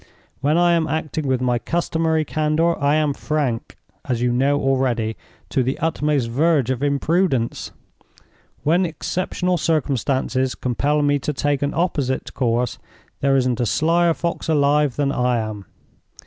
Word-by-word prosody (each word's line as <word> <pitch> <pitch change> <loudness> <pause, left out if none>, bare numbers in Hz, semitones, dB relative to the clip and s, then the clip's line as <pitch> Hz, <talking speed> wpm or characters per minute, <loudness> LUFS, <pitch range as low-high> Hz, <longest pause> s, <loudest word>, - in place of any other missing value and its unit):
When 150 +4 +1
I 175 0 +4
am 165 -2 +2
acting 155 -1 -2
with 130 -1 +1
my 125 -1 +1
customary 160 +1 0
candor, 155 +3 +1
I 145 0 +2
am 155 -2 +1
frank 140 -7 -2 0.3
(as 120 -2 -2
you 125 0 +1
know 140 +4 +2
already) 125 -5 0 0.3
to 135 - +1
the 130 +2 -1
utmost 150 -5 0
verge 140 +1 +2
of 130 -1 -3
imprudence. 145 -2 0 0.9
When 170 +5 +3
exceptional 180 +2 -2
circumstances 135 -3 0
compel 145 +4 0
me 145 0 +2
to 150 - -3
take 145 0 0
an 145 0 -1
opposite 145 -7 -1
course, 120 -1 0 0.4
there 135 0 +2
isn't 125 -3 +1
a 120 - +1
slyer 170 +4 +2
fox 170 -1 -3
alive 145 -2 +2
than 140 -1 0
I 125 -3 +1
am. 110 -3 -5
145 Hz, 150 wpm, -21 LUFS, 130-160 Hz, 0.9 s, I